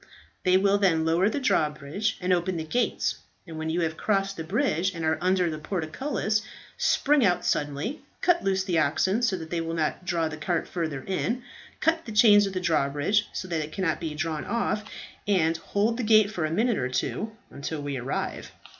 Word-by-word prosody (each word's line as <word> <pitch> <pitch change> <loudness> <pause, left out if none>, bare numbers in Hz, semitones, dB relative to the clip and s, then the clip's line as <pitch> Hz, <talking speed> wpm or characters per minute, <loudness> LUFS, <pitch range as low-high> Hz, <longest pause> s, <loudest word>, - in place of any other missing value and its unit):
They 185 0 +5
will 200 +1 +3
then 165 -5 +3
lower 170 +5 +3
the 280 - -2
drawbridge 155 - 0
and 180 0 +1
open 180 0 0
the 160 - -2
gates; 240 +11 0 0.3
and 160 -3 -8
when 160 0 -3
you 170 +2 0
have 160 -1 -1
crossed 195 -2 0
the 165 - -5
bridge 190 - 0
and 165 -1 -3
are 160 0 +1
under 185 0 +2
the 155 - -5
portcullis, 210 - -1 0.3
spring 290 -1 +3
out 180 -4 +2
suddenly, 145 - -1 0.2
cut 350 -1 +2
loose 190 -1 +1
the 180 -4 +1
oxen 185 +9 +1
so 230 -6 +2
that 160 -2 -8
they 170 -1 0
will 165 0 -3
not 160 +2 -1
draw 170 -2 0
the 155 0 -6
cart 170 +2 -1
further 155 -6 -3
in, 230 +6 -1 0.4
cut 325 0 +1
the 230 - -6
chains 210 -2 +6
of 195 - -5
the 185 - -1
drawbridge 160 +5 +1
so 185 - -5
that 165 -3 -1
it 150 - -9
cannot 185 -4 0
be 155 -2 -4
drawn 155 0 -2
off, 235 -2 -1 0.4
and 165 -5 +2
hold 210 +7 0
the 250 - -2
gate 215 -1 +5
for 175 -7 -2
a - - -1
minute 225 +4 +1
or 125 -1 -1
two 210 - -2 0.2
until 150 +2 -5
we 145 -1 -3
arrive." 125 +2 -4
180 Hz, 205 wpm, -26 LUFS, 160-210 Hz, 0.4 s, chains